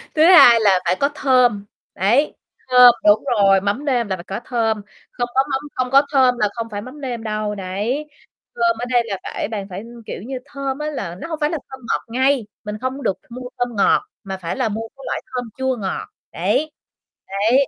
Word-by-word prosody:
thứ 310 - +5
hai 325 -10 +8
là 195 -4 +4
phải 180 +2 +2
có 280 - +2
thơm, 245 -8 +3 0.3
đấy, 240 +10 +2 0.3
thơm 250 -1 +9
đúng 210 +1 +5
rồi, 195 -2 +4
mắm 205 +9 -2
nêm 245 -5 +1
là 190 - -1
phải 170 - -10
có 195 +5 -5
thơm, 225 -4 0 0.3
không 245 -1 -3
có 265 - +5
mắm 265 - +1 0.2
không 255 -1 -1
có 275 +1 +7
thơm 255 -3 +4
là 210 -2 +1
không 230 -1 -4
phải 205 0 -4
mắm 260 +5 -11
nêm 240 -4 -4
đâu, 215 -1 -2
đấy. 205 +10 -3 0.5
Thơm 230 -1 +2
ở 245 - -2
đây 240 -1 +4
là 200 -4 -3
phải - - -4
bạn 205 -3 -5
phải 190 +4 -6 0.2
kiểu - - -6
như, 255 +3 -5
thơm 275 -1 -4
á 300 - -3
là 195 - -5
nó - - -5
hổng 320 -2 -5
phải 295 - +2
là 330 - -2
thơm 265 0 -9
ngọt - - +1
ngây, 260 -1 +1 0.2
mình 210 0 -5
không 260 +1 -2
có - - -9
được 190 - 0
mua 250 +1 -7
thơm 245 -1 -1
ngọt, 200 - +3 0.2
mà 190 -1 -5
phải 170 -2 -4
là 255 -4 0
mua 225 +2 -4
cái 275 - -13
loại - - -2
thơm 245 -2 -3
chua 260 0 0
ngọt. 195 -3 -4 0.2
Đấy, 310 0 0 0.6
đấy, 225 +8 +2
240 Hz, 225 wpm, -20 LUFS, 205-265 Hz, 0.6 s, thơm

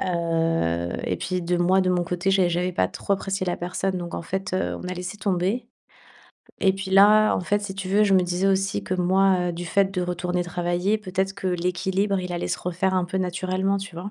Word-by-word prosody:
Heu 165 - 0
et - - -1
puis 180 0 -3
de 175 +1 0
moi, 180 +2 +3
de 185 -1 +1
mon 180 -1 +1
côté, 180 +2 -1
j'ai 190 -2 +3
j'avais 180 +1 -1
pas 95 - +1
trop 200 - -3
apprécié 195 0 -1
la 175 - -1
personne. 185 +1 -2
Donc 175 -1 -6
en - - -4
fait, 190 +3 -4
heu, 185 - -1
on 180 - -5
a 180 - -3
laissé 180 +2 -6
tomber 195 +4 -1 1.0
et 190 -1 +5
puis 195 0 -6
là, 210 +2 +6
en - - -1
fait, 205 +3 0
si 200 -2 -5
tu 195 -1 -5
veux, 205 +3 +3
je 205 -2 +3
me 190 - +6
disais 180 +2 0
aussi 195 0 0
que - - -4
moi, 185 0 +2
heu, - - -5
du 175 +1 -6
fait 195 +3 +2
de 180 - 0
retourner 180 0 -2
travailler, 175 +4 -1
peut-être 190 -1 -2
que 200 -1 -5
l'équilibre, 185 +3 0
il 180 -1 -5
allait 175 - -3
se - - -1
refaire 180 +2 -1
un 185 - +2
peu 185 - -4
naturellement, 185 +2 -1
tu 195 -3 -8
vois? 180 +4 -6
185 Hz, 235 wpm, -24 LUFS, 175-195 Hz, 1.0 s, là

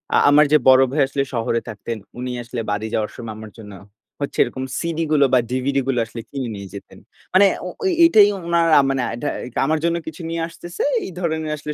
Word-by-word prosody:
আ - - +5
আমার 150 +1 +6
যে 150 - +7
বড় 130 0 +7
ভাই 145 +2 +1
আসলে 140 0 -1
শহরে 115 0 0
থাকতেন। 110 +2 -6 0.2
উনি 125 0 -4
আসলে 120 0 -5
বাড়ি 105 +2 -2
যাওয়ার 105 -1 -1
সময় 115 -2 -7
আমার 110 -1 -10
জন্য 105 -2 -10 0.5
হচ্ছে 140 - -4
এরকম 130 - -5 0.2
সিডিগুলো 155 -3 +1
বা, 130 - +6
ডিভিডিগুলো 130 0 0
আসলে 115 +1 -8
কিনে 135 -4 -4
নিয়ে 100 -1 -8
যেতেন। 100 - -11 0.3
মানে 190 +2 +6 0.2
ও - - -4
ওই 380 - +2
এটাই 215 -11 +6 0.2
উনার 170 -1 +2
আ - - +6
মানে 135 -1 0
আটা 120 +5 -3 0.4
আমার 155 +2 +1
জন্য 170 - +1
কিছু 160 +1 -7
নিয়ে 165 0 -3
আসতেছে। 170 +1 -8 0.2
এই - - -6
ধরনের 160 -3 -2
আসলে 150 +1 -5
140 Hz, 205 wpm, -21 LUFS, 120-160 Hz, 0.5 s, যে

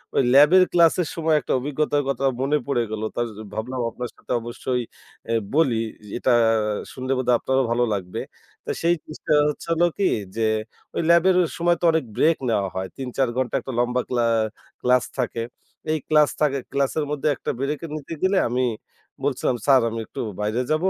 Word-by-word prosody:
ওই - - +5
ল্যাবের 150 +7 +7
ক্লাসের 170 -1 +4
সময় 160 -1 +2
একটা - - -2
অভিজ্ঞতার 145 +1 0
কথা 135 0 -2 0.2
মনে 145 +3 +2
পড়ে 130 -4 +1
গেল। 110 -1 -3
তাজ 120 0 0 0.3
ভাবলাম 125 +3 -3
আপনার 125 +1 -6
সাথে - - -11
অবশ্যই 125 +2 -3 0.5
এ - - +2 0.2
বলি। 135 -8 +3 0.4
এটা 130 - +1 0.6
শুনলে 130 +1 -4
বোধহয় 125 -1 +3
আপনারও 130 0 +1
ভালো 120 +1 +2
লাগবে। 90 -3 -4 0.5
তো - - -7
সেই 170 +1 +3
জিনিসটা 155 0 -3 0.2
হচ্ছে, 150 - -6
হলো 170 +1 +3
কি, 200 - +1 0.3
যে 115 - +1 0.5
ওই - - +1
ল্যাবের 170 +2 +5 0.2
সময় 175 0 +2
তো 175 - +1
অনেক 160 -5 0
ব্রেক 160 +1 +4
নেয়া 100 -3 +1
হয়। 95 0 -2
৩-৪ 130 -1 -1
ঘণ্টার 130 -2 0
একটা 130 - -6
লম্বা 125 +1 +1
ক্লা 120 -2 +1 0.6
ক্লাস 125 0 +3
থাকে। 120 -2 -1 0.5
এই 155 - +2
ক্লাস 150 -1 +5
থাকে 140 -2 +2
ক্লাসের 140 +2 0
মধ্যে 150 0 -1
একটা - - -3
ব্রেকে 145 +4 -2
নিতে 155 +1 -6
গেলে 190 +1 +3
আমি 125 +2 0 0.6
বলছিলাম, 130 -2 0
স্যার, 135 -2 +6
আমি 115 0 -4
একটু - - -6 0.2
বাইরে 110 +4 0
যাবো? 160 +5 +2
135 Hz, 175 wpm, -23 LUFS, 125-155 Hz, 0.6 s, ল্যাবের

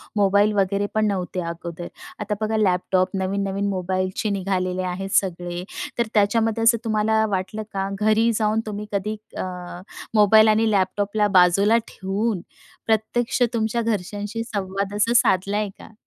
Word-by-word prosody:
Mobile 205 +1 +3
वगैरे 200 +1 +1
पण 215 - +2
नव्हते 185 -2 -2
अगोदर. 170 0 -7 0.3
आता 210 0 -2
बघा 220 0 0
लॅपटॉप, 185 -2 +1
नवीन-नवीन 195 +1 -1
मोबाईलचे 185 +2 -2
निघालेले 185 -2 -1
आहेत 195 +2 -5
सगळे, 175 -2 -5 0.3
तर 235 -2 +1
त्याच्यामध्ये 225 +2 +2
असं 230 +1 +5
तुम्हाला 220 0 +2
वाटलं 200 +4 -4
का, 195 0 -2
घरी 220 +2 +3
जाऊन 215 0 +1
तुम्ही 210 -1 -5
कधी, 205 +2 -2 0.2
अ, - - -2 0.7
मोबाईल 215 0 +6
आणि 220 +1 +3
लॅपटॉपला 205 +2 +1
बाजूला 195 +5 +4
ठेवून 195 +1 -2 0.4
प्रत्यक्ष 230 +3 0
तुमच्या 230 +1 0
घरच्यांशी 210 +1 -3
संवाद 200 -2 -3
असा 220 +3 +2
साधला 200 -2 +3
आहे 210 -1 -1
का? - - -13
205 Hz, 140 wpm, -23 LUFS, 190-220 Hz, 0.7 s, मोबाईल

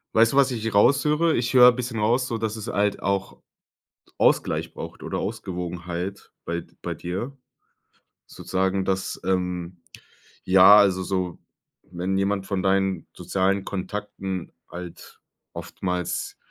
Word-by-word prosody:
Weißt 115 +1 +5
du, 140 - -1
was 135 -1 +5
ich 115 -2 -3
raushöre? 150 +9 +3
Ich 120 +1 -1
höre 125 -1 +9
'n - - -9
bisschen 120 -3 -4
raus, 120 +4 +2
sodass 110 -2 -2
es 110 0 -7
halt 105 0 0
auch 100 -1 -2 0.8
Ausgleich - - +1
braucht - - -8
oder - - -4
Ausgewogenheit 90 -2 -5
bei 85 0 -3
d - - -15
bei - - -3
dir. 110 +11 -5 0.9
Sozusagen, 95 0 -1
dass, 95 0 -2
ähm 90 -2 -2 0.6
ja, 95 +2 +8
also 95 -2 +3
so, 90 -1 -2 0.5
wenn 90 +2 -2
jemand 100 0 0
von 95 -2 -2
deinen 95 -2 +1
sozialen 95 +1 0
Kontakten 95 -2 -5 0.2
halt 90 0 -10 0.3
oftmals 90 -2 -4
95 Hz, 130 wpm, -24 LUFS, 90-110 Hz, 0.9 s, höre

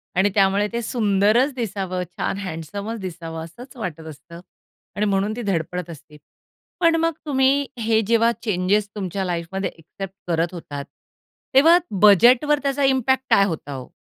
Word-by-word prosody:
आणि 190 +3 +3
त्यामुळे 200 +1 +3
ते 235 - -1
सुंदरच 215 +4 +2
दिसावं, 190 -6 -3
छान 195 - -2
हँडसमचं 200 +5 -5
दिसावं 165 -3 -6
असंच 240 - -12
वाटत 180 -8 -5
असतं 160 +3 -11 0.6
आणि 210 +1 0
म्हणून 200 +1 0
ती 245 - -5
धडपडत 180 -3 -2
असते. 150 -1 -12 0.6
पण 335 -2 +4
मग 330 0 +1
तुम्ही 275 0 +2
हे 225 0 +2
जेव्हा 230 0 +3
चेंजेस 200 0 +1
तुमच्या 190 -1 -3
लाईफमध्ये 175 +2 -3
एक्सेप्ट 190 +4 -9
करत 170 +1 0
होतात 145 -5 -7 0.7
तेव्हा 325 +6 +7 0.2
बजेटवर 240 +8 +6
त्याचा 275 0 0
इम्पॅक्ट 265 0 +2
काय 195 - +5
होता 160 -5 -5
हो? 130 -1 -8
200 Hz, 145 wpm, -22 LUFS, 175-240 Hz, 0.7 s, तेव्हा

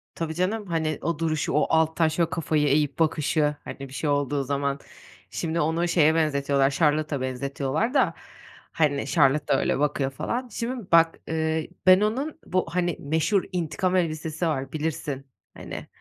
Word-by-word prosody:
Tabii 165 -1 -3
canım. 200 +5 -1
Hani 160 -3 -1
o 170 -3 -2
duruşu, 155 -3 -1
o 150 - +3
alttan 160 0 +3
şöyle 160 +1 0
kafayı 155 -3 0
eğip 145 +1 +1
bakışı. 150 -1 +1
Hani, - - -8
bir 135 -1 -8
şey 150 +2 -2
olduğu 145 0 0
zaman. 140 0 -1 0.5
Şimdi 165 0 -2
onu 165 +3 +1
şeye 160 -2 +4
benzetiyorlar, 140 -3 +2
Charlotte'a 150 -1 +1
benzetiyorlar 140 - -2
da, 275 - +3 0.6
hani, 145 -3 +1
Charlotte 145 -1 +3
da 135 - +3
öyle - - 0
bakıyor 145 -2 0
falan. 245 - -3
Şimdi 235 -1 -5
bak, 165 0 +5
eee, 160 0 -1 0.2
ben 185 +1 +8
onun 265 +9 -1
bu 185 0 0
hani 175 0 -1
meşhur 160 +7 +1
intikam 180 +1 -1
elbisesi 160 -1 -1
var, 135 -4 -2
bilirsin. 150 -3 -3 0.3
Hani. - - -8
155 Hz, 155 wpm, -25 LUFS, 145-170 Hz, 0.6 s, ben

